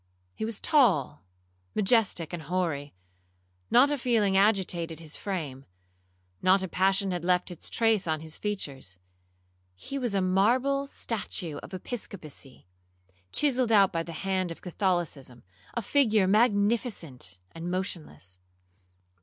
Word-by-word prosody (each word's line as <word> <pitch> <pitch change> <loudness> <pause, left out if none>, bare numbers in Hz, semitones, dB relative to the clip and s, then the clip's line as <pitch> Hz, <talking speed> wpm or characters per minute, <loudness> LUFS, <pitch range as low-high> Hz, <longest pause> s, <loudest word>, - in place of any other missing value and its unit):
He 220 - -4
was 220 -2 -3
tall, 215 - +3 0.5
majestic, 205 -6 +2
and 175 - -4
hoary; 155 - -2 0.7
not 270 +4 +6
a 290 - -1
feeling 220 -6 +2
agitated 185 -5 +2
his 160 -2 -6
frame—not 90 - -3
a - - -2
passion 190 +2 +2
had 175 -2 -3
left 180 +1 +1
its 175 - -5
trace 225 -5 +2
on 155 -1 0
his 160 0 -5
features. 140 - -4 0.8
He 275 - -5
was 240 -6 -1
a - - +3
marble 245 +10 +2
statue 190 - -3
of - - -10
Episcopacy, 180 - -7 0.7
chiselled 255 -5 +2
out 200 -3 +5
by 165 - 0
the 165 0 -7
hand 185 -2 0
of 165 - -9
Catholicism,—a 150 - -3
figure 220 -5 +3
magnificent 205 - +1
and 165 +1 -6
motionless. 165 - -5
185 Hz, 120 wpm, -28 LUFS, 155-215 Hz, 0.8 s, not